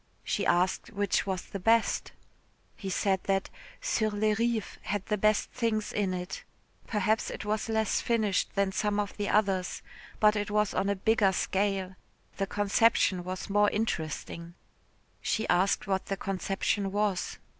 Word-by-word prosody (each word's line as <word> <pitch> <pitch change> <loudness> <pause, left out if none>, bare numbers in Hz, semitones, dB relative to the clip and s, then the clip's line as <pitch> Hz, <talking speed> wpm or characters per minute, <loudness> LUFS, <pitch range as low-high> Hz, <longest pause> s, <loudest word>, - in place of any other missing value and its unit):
She 200 - -1
asked 180 +2 +1
which 205 -3 0
was 190 -1 -2
the 195 - -6
best. 225 +4 +2 0.6
He 195 - -6
said 190 0 +1
that 195 -1 0 0.3
"Sur 225 - +1
les 210 +1 +1
Rives" 230 -1 -1
had 200 0 -3
the 210 - 0
best 215 +1 +2
things 225 -3 -1
in 200 -3 0
it. 180 0 -5 0.4
Perhaps 215 +1 +1
it - - -6
was 215 +2 -1
less 220 -1 +1
finished 215 -5 0
than 200 -1 +2
some 210 +1 0
of 205 -1 -2
the 205 -1 -1
others, 195 -3 +1 0.4
but 210 0 +5
it 205 -1 -1
was 210 0 +1
on 195 - 0
a 200 - +1
bigger 200 0 +3
scale, 190 -1 -1 0.4
the 195 - -1
conception 205 -2 +2
was 185 +1 -5
more 205 +1 +4
interesting. 170 -4 -3 0.7
She 220 - -1
asked 185 +3 +2
what 190 -1 -1
the 195 - -2
conception 195 +1 -1
was. 205 -2 -1
205 Hz, 155 wpm, -29 LUFS, 190-215 Hz, 0.7 s, but